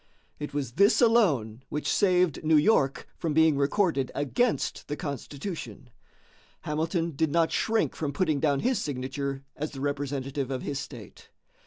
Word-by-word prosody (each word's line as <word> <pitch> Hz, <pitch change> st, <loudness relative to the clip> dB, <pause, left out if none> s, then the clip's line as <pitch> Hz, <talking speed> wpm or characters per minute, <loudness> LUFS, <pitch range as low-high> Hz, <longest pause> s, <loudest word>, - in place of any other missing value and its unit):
It 150 Hz, -, -5 dB
was 140 Hz, -4 st, -3 dB
this 200 Hz, -, +4 dB
alone 150 Hz, -, +3 dB
which 150 Hz, -, -3 dB
saved 180 Hz, -5 st, +2 dB
New 155 Hz, 0 st, +4 dB
York 145 Hz, -5 st, +2 dB
from 160 Hz, -4 st, -1 dB
being 160 Hz, -1 st, +5 dB
recorded 140 Hz, -1 st, +1 dB
against 225 Hz, -, 0 dB
the 150 Hz, -, -3 dB
Constitution. 145 Hz, -, -6 dB, 0.7 s
Hamilton 165 Hz, +2 st, -1 dB
did 160 Hz, +2 st, 0 dB
not 165 Hz, 0 st, +2 dB
shrink 225 Hz, 0 st, +1 dB
from 150 Hz, -3 st, -2 dB
putting 155 Hz, 0 st, 0 dB
down 140 Hz, -3 st, +1 dB
his 255 Hz, -3 st, +1 dB
signature 135 Hz, -1 st, -3 dB
as 150 Hz, +1 st, -4 dB
the 135 Hz, -, -7 dB
representative 140 Hz, -1 st, -2 dB
of 130 Hz, -1 st, -3 dB
his 145 Hz, -1 st, -3 dB
state. 120 Hz, -9 st, -10 dB
145 Hz, 150 wpm, -27 LUFS, 135-165 Hz, 0.7 s, being